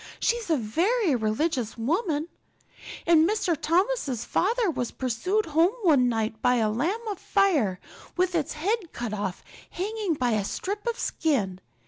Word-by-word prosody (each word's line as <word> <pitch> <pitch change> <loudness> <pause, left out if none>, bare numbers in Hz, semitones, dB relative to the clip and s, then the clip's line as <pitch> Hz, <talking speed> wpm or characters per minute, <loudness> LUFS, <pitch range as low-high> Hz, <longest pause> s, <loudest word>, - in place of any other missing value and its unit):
She's 470 -4 0
a 320 - +3
very 340 - +1
religious 235 +2 -1
woman. 310 - 0 0.8
And 330 0 +5
Mrs. 390 -6 0
Thomas's 335 - 0
father 440 0 +1
was 245 -5 -2
pursued 265 - -1
home 330 +7 +2
one 280 -8 +4
night 220 -1 -2
by 250 - +3
a 220 -3 +2
lamb 365 - -1
of 395 - -6
fire 300 - +2 0.4
with 365 0 +2
its 320 -5 -1
head 370 +3 -2
cut 235 -3 -4
off 200 -3 -4 0.3
hanging 405 -2 -2
by 250 -3 0
a 215 -2 +1
strip 405 - -4
of 470 0 0
skin. 210 - -1
320 Hz, 150 wpm, -26 LUFS, 240-395 Hz, 0.8 s, And